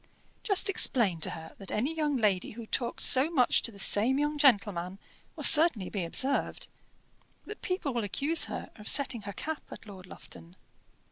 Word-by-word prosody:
"Just 400 -2 +1
explain 235 - +3
to - - -1
her 160 0 -11
that 195 - -6
any 255 +9 -3
young 300 -3 -3
lady 205 -5 -2
who 230 +1 -11
talks 235 +2 -3
so 270 +4 +2
much 260 -8 +1
to 235 - -5
the 200 - -17
same 220 +6 +1
young 295 +1 -2
gentleman 200 -9 0 0.4
will - - -9
certainly 300 - +6
be 195 -4 -5
observed 260 +11 -3 0.8
that 425 - -11
people 365 -7 -4
will 235 -2 -3
accuse 285 - +1
her - - -9
of 210 - -12
setting 260 -5 +2
her - - -8
cap 315 +7 -7
at - - -12
Lord 190 -3 -14
Lufton. 170 0 -13
235 Hz, 180 wpm, -27 LUFS, 200-295 Hz, 0.8 s, certainly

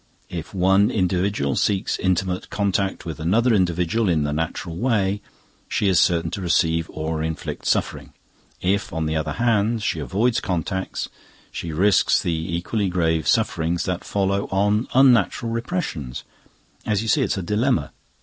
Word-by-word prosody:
If 85 -3 -6
one 95 +2 +3
individual 90 - 0
seeks 100 -2 0
intimate 95 0 -1
contact 100 -1 -1
with 80 -3 -6
another 115 +10 +2
individual 90 +3 +1
in 80 -4 +2
the 75 0 -1
natural 80 +2 -3
way, 100 -2 0 0.5
she 105 -3 +1
is 95 -4 +4
certain 85 -2 +2
to 100 - -4
receive 85 -2 +1
or 80 0 -3
inflict 80 0 -4
suffering. - - -1 0.5
If 100 +3 0
on 80 -1 -2
the 80 0 -1
other 80 -1 -1
hand, 115 +1 +1
she 85 - -1
avoids 105 - +1
contacts, 95 +1 -3 0.4
she 85 - -5
risks 95 +6 +3
the 85 - -1
equally 85 +5 -2
grave 80 -3 0
sufferings 85 -6 +1
that 90 -1 -3
follow 100 0 0
on 105 +4 +1
unnatural 125 -3 +4
repressions. 115 - -3 0.6
As 105 0 0
you - - -5
see, 145 +5 +3
it's 110 -5 0
a 95 - -3
dilemma." 105 - 0
95 Hz, 150 wpm, -22 LUFS, 80-105 Hz, 0.6 s, is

